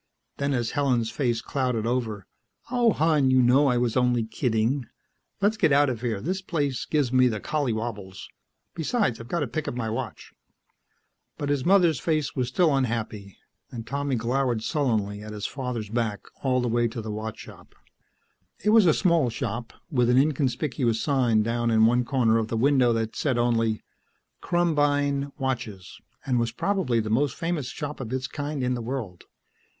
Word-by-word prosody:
Then 140 Hz, -1 st, 0 dB
as 120 Hz, -2 st, -1 dB
Helen's 125 Hz, -6 st, +1 dB
face 120 Hz, -5 st, 0 dB
clouded 125 Hz, -5 st, -1 dB
over, 115 Hz, -5 st, -2 dB, 0.5 s
"Oh, 240 Hz, -2 st, +3 dB
hon, 155 Hz, -5 st, +2 dB
you 130 Hz, 0 st, +4 dB
know 130 Hz, +4 st, +5 dB
I 125 Hz, -2 st, +2 dB
was 120 Hz, -2 st, 0 dB
only 125 Hz, -2 st, +2 dB
kidding. 115 Hz, +2 st, -1 dB, 0.5 s
Let's 210 Hz, +2 st, +2 dB
get 160 Hz, -8 st, +3 dB
out 140 Hz, -1 st, +4 dB
of 115 Hz, -3 st, -6 dB
here; 115 Hz, -5 st, -1 dB
this 185 Hz, -, -2 dB
place 145 Hz, -8 st, -2 dB
gives 145 Hz, -5 st, 0 dB
me 130 Hz, 0 st, +5 dB
the 110 Hz, -3 st, -1 dB
collywobbles. 115 Hz, -10 st, -3 dB, 0.5 s
Besides, 165 Hz, -, 0 dB
I've 115 Hz, -, -9 dB
got 170 Hz, +5 st, -1 dB
to 145 Hz, -, 0 dB
pick 155 Hz, +5 st, -4 dB
up -, -, -3 dB
my 115 Hz, -3 st, -2 dB
watch." 115 Hz, -, -6 dB, 1.0 s
But 145 Hz, -, -3 dB
his 145 Hz, -3 st, 0 dB
mother's 175 Hz, -7 st, +4 dB
face 155 Hz, +1 st, -1 dB
was 125 Hz, -2 st, 0 dB
still 150 Hz, +3 st, +2 dB
unhappy 110 Hz, -6 st, -3 dB, 0.3 s
and 115 Hz, -2 st, -7 dB
Tommy 140 Hz, 0 st, -2 dB
glowered 120 Hz, 0 st, 0 dB
sullenly 110 Hz, -10 st, -1 dB
at 105 Hz, 0 st, -8 dB
his 105 Hz, -1 st, -5 dB
father's 125 Hz, -6 st, -4 dB
back 115 Hz, -3 st, -1 dB, 0.2 s
all 130 Hz, -2 st, +1 dB
the 125 Hz, -, -1 dB
way 120 Hz, 0 st, +2 dB
to 115 Hz, +1 st, -6 dB
the 110 Hz, -1 st, -5 dB
watch 110 Hz, +1 st, -5 dB
shop. -, -, -13 dB, 0.9 s
It 210 Hz, -, +3 dB
was 220 Hz, -4 st, +6 dB
a 155 Hz, -, +5 dB
small 170 Hz, -9 st, +3 dB
shop, 115 Hz, -1 st, -4 dB, 0.2 s
with 125 Hz, -4 st, +2 dB
an 125 Hz, -, +4 dB
inconspicuous 135 Hz, -4 st, +1 dB
sign 120 Hz, -7 st, +2 dB
down 120 Hz, +1 st, 0 dB
in 110 Hz, -1 st, +5 dB
one 120 Hz, +2 st, +3 dB
corner 120 Hz, -4 st, +2 dB
of 110 Hz, -, -2 dB
the 115 Hz, -, -2 dB
window 130 Hz, 0 st, +4 dB
that 115 Hz, -1 st, -2 dB
said 130 Hz, -5 st, 0 dB
only, 115 Hz, -2 st, +1 dB, 0.6 s
"KRUMBEIN 145 Hz, -4 st, +1 dB
watches," 120 Hz, -9 st, -4 dB, 0.2 s
and 125 Hz, -3 st, +1 dB
was 115 Hz, -1 st, 0 dB
probably 160 Hz, -, 0 dB
the 110 Hz, -1 st, -2 dB
most 135 Hz, +5 st, +1 dB
famous 165 Hz, -6 st, -2 dB
shop 150 Hz, +1 st, -6 dB
of 120 Hz, -4 st, -6 dB
its 130 Hz, 0 st, -2 dB
kind 145 Hz, 0 st, -4 dB
in 125 Hz, 0 st, +1 dB
the 120 Hz, -, -3 dB
world. 115 Hz, -7 st, -5 dB
125 Hz, 180 wpm, -26 LUFS, 115-145 Hz, 1.0 s, was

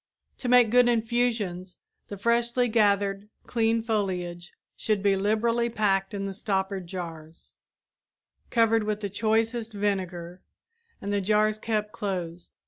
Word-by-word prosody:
To 250 Hz, -, -3 dB
make 245 Hz, -3 st, +6 dB
good 245 Hz, 0 st, +5 dB
infusions 225 Hz, -6 st, -1 dB, 0.3 s
the 200 Hz, -, -7 dB
freshly 235 Hz, +3 st, +1 dB
gathered, 205 Hz, -2 st, +1 dB, 0.2 s
clean 225 Hz, -1 st, +1 dB
foliage 180 Hz, -6 st, -2 dB, 0.2 s
should 210 Hz, -3 st, -1 dB
be 200 Hz, -1 st, +4 dB
liberally 230 Hz, +4 st, +1 dB
packed 200 Hz, -3 st, 0 dB
in 195 Hz, 0 st, -3 dB
stoppered 190 Hz, -2 st, -2 dB
jars, 165 Hz, -3 st, -8 dB, 1.0 s
covered 225 Hz, -1 st, +3 dB
with 210 Hz, 0 st, -2 dB
the 200 Hz, -2 st, -4 dB
choicest 225 Hz, +2 st, 0 dB
vinegar, 185 Hz, -4 st, -3 dB, 0.6 s
and 200 Hz, +1 st, -3 dB
the 200 Hz, -, +1 dB
jars 215 Hz, +2 st, +2 dB
kept 215 Hz, -1 st, -2 dB
closed. 180 Hz, -6 st, -5 dB
210 Hz, 125 wpm, -27 LUFS, 190-225 Hz, 1.0 s, make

